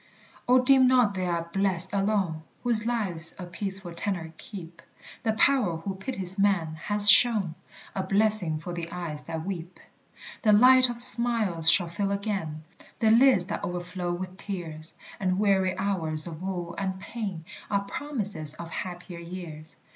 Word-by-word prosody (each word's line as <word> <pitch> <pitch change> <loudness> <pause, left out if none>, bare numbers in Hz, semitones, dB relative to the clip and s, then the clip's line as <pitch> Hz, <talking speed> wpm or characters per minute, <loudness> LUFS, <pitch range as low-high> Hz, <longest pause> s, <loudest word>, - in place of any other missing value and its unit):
Oh, 250 +1 +4
deem 260 0 +5
not 250 -5 +2
they 185 -1 -3
are 170 -1 -3
blest 190 -2 +3
alone 195 -5 -1 0.2
Whose 230 -2 0
lives 185 -9 +2
a 180 - -8
peaceful 190 0 -5
tenor 170 -3 -5
keep; 175 -4 -12 0.4
The 220 -2 -1
Power 225 -7 +1
who 190 +4 -6
pities 190 -2 0
man, 190 -6 0
has 205 +6 +4
shown 205 -5 +6 0.4
A 190 - -3
blessing 200 -5 +2
for 170 +3 -8
the 170 -1 -6
eyes 170 -4 -6
that 160 +1 -6
weep. 180 -2 -7 0.6
The 215 -2 +3
light 255 +3 +6
of 240 -1 -6
smiles 230 -9 +4
shall 175 +1 +5
fill 195 +4 -3
again 195 -7 -4 0.3
The 220 -2 +2
lids 235 -5 +4
that 205 - -6
overflow 175 0 -5
with 185 +1 -7
tears; 165 -6 -8 0.2
And 185 -1 -1
weary 190 -2 0
hours 165 -6 -2
of 165 -2 -9
woe 180 -2 -5
and 190 -1 -4
pain 195 -5 -7 0.2
Are 200 -1 -1
promises 200 - -3
of 170 +1 -10
happier 175 0 -8
years. 170 -3 -10
190 Hz, 155 wpm, -25 LUFS, 170-210 Hz, 0.6 s, shown